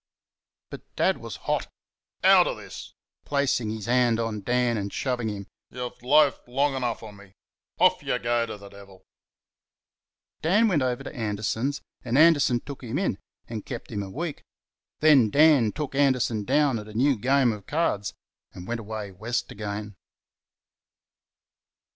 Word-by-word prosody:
But - - -7
Dad - - +2
was - - -7
hot. - - 0 0.6
"Out - - +7
of - - -3
this!" - - -10 0.3
(placing 140 -6 0
his 110 -1 -5
hand 120 -1 +2
on 115 -2 -2
Dan, 125 +2 +1
and 100 -2 -3
shoving 125 -4 -2
him). 100 -1 -6 0.2
"You've 125 -1 -7
loafed 145 +2 +3
long 135 +3 +1
enough 125 -3 -2
on 105 -2 -10
me! 100 -1 -16 0.4
Off - - +4
y' - - -1
go 120 0 0
t' 110 - -6
th' 100 0 -13
devil!" 100 -2 -15 1.4
Dan 205 +8 +3
went 175 -9 +2
over 125 -1 -1
to - - -8
Anderson's 110 +5 -2 0.2
and 125 +1 0
Anderson 145 -6 +5
took 140 -2 -9
him 120 +2 -4
in 180 - -1 0.3
and 110 -3 -5
kept 120 -1 -7
him 105 -2 -2
a 100 - -6
week. 155 - -5 0.6
Then 145 -8 +6
Dan 145 -5 +5
took 150 +1 -5
Anderson 125 -6 +1
down 140 -2 +2
at 105 - -9
a 105 - -11
new 135 +4 +3
game 130 +2 +2
of 105 -3 -8
cards, 145 -10 -1 0.4
and 90 +1 -10
went 120 0 -2
away 105 -2 -6
West 110 +6 -3
again. 105 0 -5
120 Hz, 160 wpm, -26 LUFS, 105-140 Hz, 1.4 s, Out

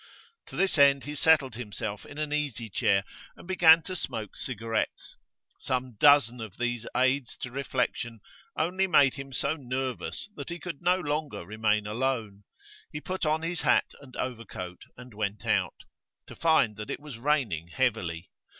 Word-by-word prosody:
To - - -10
this 190 -5 +2
end 140 -1 +6
he 150 - -5
settled 150 -4 +4
himself 105 -3 -5
in 145 - -11
an 150 -1 -2
easy 135 -7 -2
chair 100 0 +2 0.3
and - - -14
began 165 -3 +7
to 185 - -5
smoke 110 - -4
cigarettes. 115 -2 -3 0.4
Some 130 0 -2
dozen 140 -5 +6
of 110 -3 -8
these 120 -1 -2
aids 130 +1 +1
to 125 - -5
reflection 125 -3 -2 0.4
only 185 +4 +1
made 140 -7 +5
him 135 -1 -8
so 140 +3 0
nervous 130 0 -4
that 140 - -7
he 170 - -4
could 170 -5 -7
no 180 +1 +3
longer 145 - -3
remain 105 +1 +1
alone. 110 -3 -2 0.5
He 150 - -4
put 185 0 -3
on 155 +1 +1
his 170 0 -2
hat - - +3
and 135 -3 -14
overcoat 110 -8 -5 0.2
and 125 -1 -12
went 105 -1 -3
out - - 0 0.4
to - - -11
find 155 -11 +3
that 105 -1 -6
it - - -3
was 145 -6 -9
raining 120 - 0
heavily. 95 -7 -1
130 Hz, 165 wpm, -28 LUFS, 110-150 Hz, 0.5 s, began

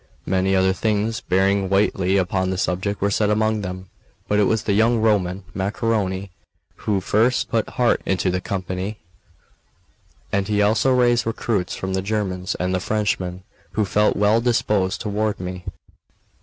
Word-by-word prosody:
Many 95 0 +1
other 95 0 +3
things 110 +2 -1
bearing 95 +1 +1
weightily 95 -1 +2
upon 95 0 0
the 95 - -2
subject 95 +3 -1
were 100 +1 +1
said 105 +1 +1
among 110 0 +1
them. 95 -1 -7 0.4
But 105 - +2
it 105 - +4
was 110 +2 +1
the 100 - 0
young 115 +3 +3
Roman, 100 -4 +1
Macaroni, 100 -1 -1 0.5
who 100 -3 -1
first 115 +7 +1
put 115 -2 0
heart 120 -2 +1
into 95 -1 0
the 90 0 -1
company; 95 +1 -4 1.3
and 100 -1 0
he 105 -1 0
also 110 +6 +3
raised 120 -2 +3
recruits 110 -4 -1
from 95 0 -4
the 95 - 0
Germans 95 -3 -2
and 90 +1 -1
the 95 - +1
Frenchmen, 95 -3 -2 0.3
who 105 - +1
felt 105 +2 +2
well 105 +3 +3
disposed 105 -5 +1
toward 105 -1 -1
me. 90 0 -6
100 Hz, 155 wpm, -22 LUFS, 95-110 Hz, 1.3 s, it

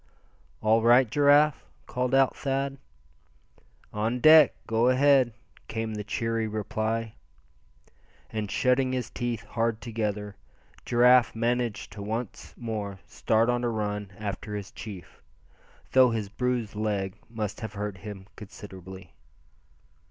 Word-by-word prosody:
"All 110 +1 +3
right, 120 +2 +6
Giraffe?" 145 +4 +4 0.2
called 125 +1 -1
out 135 -1 +4
Thad. 135 0 -2 1.1
"On 110 +4 -1
deck; 155 -1 +7
go 115 +2 +2
ahead!" 130 -1 +4 0.4
came 110 -1 -3
the 105 -1 -4
cheery 115 +1 -1
reply. 110 +1 -2 1.2
And 105 -2 -3
shutting 130 +2 +2
his 125 -3 -3
teeth 120 -2 -3
hard 115 -1 -1
together, 105 -3 -3 0.5
Giraffe 125 -1 +5
managed 120 -2 -1
to 100 +1 -8
once 110 +2 -5
more 105 -4 -4
start 110 +1 +1
on 120 0 0
a 120 - +1
run 105 -3 -3
after 105 0 -5
his 100 -1 -6
chief, 100 -5 -10 0.7
though 130 -1 +6
his 110 -3 -3
bruised 120 -1 -2
leg 105 -3 -2
must 110 -2 -4
have 110 -2 -5
hurt 105 -2 -5
him 100 -1 -8
considerably. 95 -3 -11
115 Hz, 120 wpm, -27 LUFS, 105-125 Hz, 1.2 s, deck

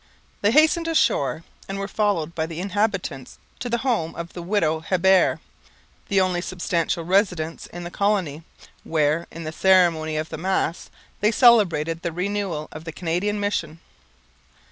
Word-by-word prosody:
They 205 - +3
hastened 315 +6 +4
ashore; 165 - +1 0.3
and 195 - -3
were 195 0 -3
followed 200 -7 0
by 160 -1 -2
the 165 0 -7
inhabitants 195 - -2 0.2
to 245 - -4
the 235 - +1
home 215 -11 0
of 170 0 -7
the 175 - -6
widow 170 -4 0
Hebert, 185 +3 +3 0.7
the 200 -2 +2
only 185 -2 +1
substantial 170 -2 -2
residence 180 -4 0
in 175 - -8
the 175 - -7
colony, 190 -8 0 0.4
where, 155 +1 0
in 165 - -8
the 155 - -4
ceremony 165 -4 +3
of 155 +1 -3
the 160 - -6
Mass, 185 -1 -1 0.3
they 210 - +3
celebrated 180 - +4
the 170 - -3
renewal 180 -3 -3
of 155 - -9
the 165 - -5
Canadian 180 +6 -2
mission. 170 -6 -2
175 Hz, 155 wpm, -23 LUFS, 160-205 Hz, 0.7 s, hastened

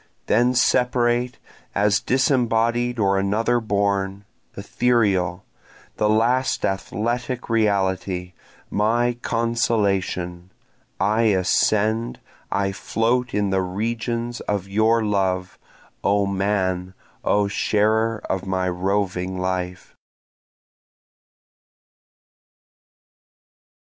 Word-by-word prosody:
Then 120 +3 +2
separate, 125 -1 +2 0.4
as 100 -1 +3
disembodied 120 -2 +1
or 100 -2 +2
another 110 +5 +1
born, 100 -2 -1 0.3
Ethereal, 100 -4 +1 0.5
the 105 -1 +2
last 120 +4 +2
athletic 120 +5 -2
reality, 95 -4 0 0.4
my 120 +3 +1
consolation, 100 -7 -1 0.5
I 110 +4 +2
ascend, 110 +5 +1 0.3
I 100 -1 0
float 115 +6 -1
in 100 -1 +1
the 95 0 +2
regions 115 +5 -3
of 100 -2 -3
your 110 +3 +2
love 95 -3 -1 0.4
O 100 +1 +2
man, 95 -2 -1 0.3
O 105 0 +2
sharer 110 +2 +1
of 95 0 -3
my 95 -1 0
roving 95 0 -1
life. 90 -1 -3
105 Hz, 80 wpm, -22 LUFS, 95-115 Hz, 0.5 s, as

